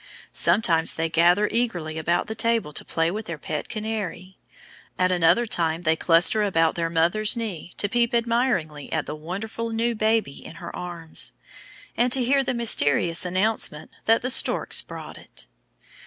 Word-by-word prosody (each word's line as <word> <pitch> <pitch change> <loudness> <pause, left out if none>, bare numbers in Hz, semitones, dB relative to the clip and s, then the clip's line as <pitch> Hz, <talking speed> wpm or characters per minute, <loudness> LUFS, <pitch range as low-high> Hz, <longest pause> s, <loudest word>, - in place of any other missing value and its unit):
Sometimes 165 -6 +3
they 165 0 -2
gather 175 +5 +3
eagerly 175 -10 -1
about 170 +2 0
the 220 - -5
table 225 -8 0
to - - -1
play 165 +1 -1
with 215 +3 -6
their 165 - -5
Pet 150 0 -5
Canary; 210 -4 -5 0.6
at 185 0 +1
another 180 +7 +3
time 165 -5 -1
they 160 -1 +2
cluster 170 +6 +4
about 165 -6 +1
their 165 -1 -2
mother's 175 +8 +2
knee 195 -7 -5
to 205 - 0
peep 235 +3 +1
admiringly 230 - -1
at 160 - -2
the 150 - -6
wonderful 200 +9 -6
new 230 +1 -1
baby 215 -8 -1
in - - -11
her 170 - -9
arms, 170 -2 +1 0.6
and 245 +1 +1
to 260 - +3
hear 270 +3 +2
the 255 - -2
mysterious 170 - +2
announcement 185 -4 0
that 225 +1 +3
The 255 - +3
Storks - - +2
Brought - - -10
It. - - -11
185 Hz, 165 wpm, -23 LUFS, 165-225 Hz, 0.6 s, cluster